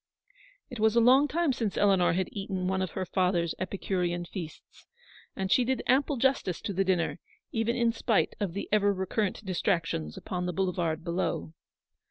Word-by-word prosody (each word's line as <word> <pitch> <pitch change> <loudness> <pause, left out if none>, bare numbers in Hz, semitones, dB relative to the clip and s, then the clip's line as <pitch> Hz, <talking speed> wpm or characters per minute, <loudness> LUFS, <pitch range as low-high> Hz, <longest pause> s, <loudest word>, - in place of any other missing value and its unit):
It 245 - -7
was 220 +1 +3
a - - +6
long 260 +5 +6
time 320 -2 +1
since 225 -6 -2
Eleanor 195 -4 +4
had 185 +1 0
eaten 195 -2 -3
one 190 0 0
of 185 -3 -3
her 190 - -1
father's 180 -3 +1
epicurean 180 -2 -2
feasts, 170 -3 -9 0.5
and 190 0 -3
she 255 - +5
did 260 +2 -1
ample 270 +2 +2
justice 240 -8 +1
to 200 - -3
the 195 +1 +2
dinner, 180 -2 0 0.3
even 225 +1 0
in 235 -1 +2
spite 225 -2 +1
of 200 -5 -2
the 200 - -4
ever 205 -1 +3
recurrent 190 +2 -2
distractions 170 - -1
upon 180 -1 -4
the 180 - -2
boulevard 170 -3 -1
below. 170 - -2
190 Hz, 175 wpm, -29 LUFS, 180-225 Hz, 0.5 s, a